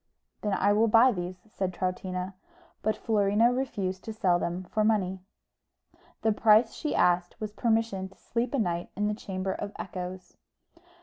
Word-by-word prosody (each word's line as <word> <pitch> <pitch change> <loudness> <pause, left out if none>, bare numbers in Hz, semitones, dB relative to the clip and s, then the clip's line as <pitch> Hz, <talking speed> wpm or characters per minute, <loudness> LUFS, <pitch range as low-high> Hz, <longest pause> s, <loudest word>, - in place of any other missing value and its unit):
"Then 210 -2 -1
I 200 +1 +3
will 220 +2 +4
buy 230 +4 +6
these," 180 -3 -4
said 190 -3 -3
Troutina; 185 0 -3 0.5
but 215 - 0
Florina 215 +2 +3
refused 195 -8 -2
to 220 - -5
sell 185 -5 +2
them 175 +2 -2
for 215 +4 -1
money: 195 -4 +1 1.0
the 220 - +4
price 220 +2 +5
she 305 - -3
asked 175 +2 +2
was 215 -2 -4
permission 220 -5 0
to 190 - -21
sleep 240 +3 -2
a - - +1
night 175 -6 -1
in 210 +1 0
the 210 - 0
Chamber 190 -2 -3
of 205 - -5
Echoes. 180 0 -7
200 Hz, 165 wpm, -28 LUFS, 185-220 Hz, 1.0 s, buy